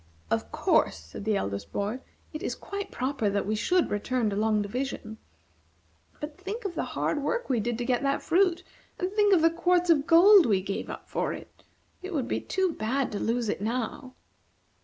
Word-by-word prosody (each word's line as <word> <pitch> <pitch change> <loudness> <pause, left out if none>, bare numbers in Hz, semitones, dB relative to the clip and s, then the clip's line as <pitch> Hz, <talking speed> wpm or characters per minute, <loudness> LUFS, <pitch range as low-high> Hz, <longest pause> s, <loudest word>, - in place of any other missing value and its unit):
"Of - - -1
course," - - +2
said 80 - -10
the 215 -2 +2
eldest 100 - -4
boy, 210 +5 -2 0.3
"it 305 - -5
is - - -2
quite 400 0 -6
proper 255 -4 -1
that 200 0 -1
we 210 - -1
should 350 +12 +1
return 220 +1 0
to - - -2
Long 215 0 +2
Division. 220 0 -4 1.0
But 295 +3 -7
think 415 +5 -5
of 385 - -2
the - - -2 0.2
hard 295 - 0
work 475 - -1
we 245 - +2
did 235 +2 -1
to 240 - -3
get 245 -1 +1
that 275 0 0
fruit, 360 0 +2 0.3
and 365 -1 -2
think 415 -1 +3
of 350 -4 +5
the 330 - +5
quarts 350 +1 +2
of 295 -2 +2
gold 360 +1 +8
we 200 -4 +3
gave 195 0 -4
up - - -8
for - - -1
it! - - -12 0.4
It 370 -1 -5
would 265 -5 -1
be - - -1
too 380 -2 0
bad 255 +4 -1
to 205 - -3
lose 235 0 0
it 205 - -2
now!" 245 +3 -3
260 Hz, 200 wpm, -28 LUFS, 215-350 Hz, 1.0 s, gold